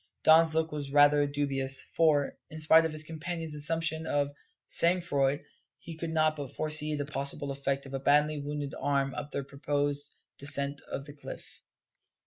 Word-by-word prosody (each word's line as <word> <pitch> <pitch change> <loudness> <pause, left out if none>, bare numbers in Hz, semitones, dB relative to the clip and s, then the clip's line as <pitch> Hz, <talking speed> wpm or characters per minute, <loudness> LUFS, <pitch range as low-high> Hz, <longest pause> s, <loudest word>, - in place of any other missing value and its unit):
Don's 160 0 +5
look 160 0 0
was 145 -2 -5
rather 145 0 +5
dubious, 135 -2 0
for, 150 -4 +2
in 155 - -8
spite 160 +1 +5
of 160 - -2
his 155 0 -5
companion's 165 0 -5
assumption 160 +2 -1
of 145 -1 0 0.3
sang 175 +2 +4
froid, 140 -4 0 0.3
he 165 - -10
could 165 +1 -5
not 155 -1 +1
but 145 -4 -8
foresee 155 0 +2
the 145 -1 -3
possible 140 0 -4
effect 140 0 -2
of 135 - -10
a 135 - -2
badly 150 +2 +2
wounded 145 0 -5
arm 140 -1 0
upon 140 +3 -5
their 140 - -3
proposed 145 +1 -2 0.2
descent 140 0 +2
of 140 - -4
the 145 - -11
cliff. 145 - -11
145 Hz, 170 wpm, -29 LUFS, 140-155 Hz, 0.3 s, Don's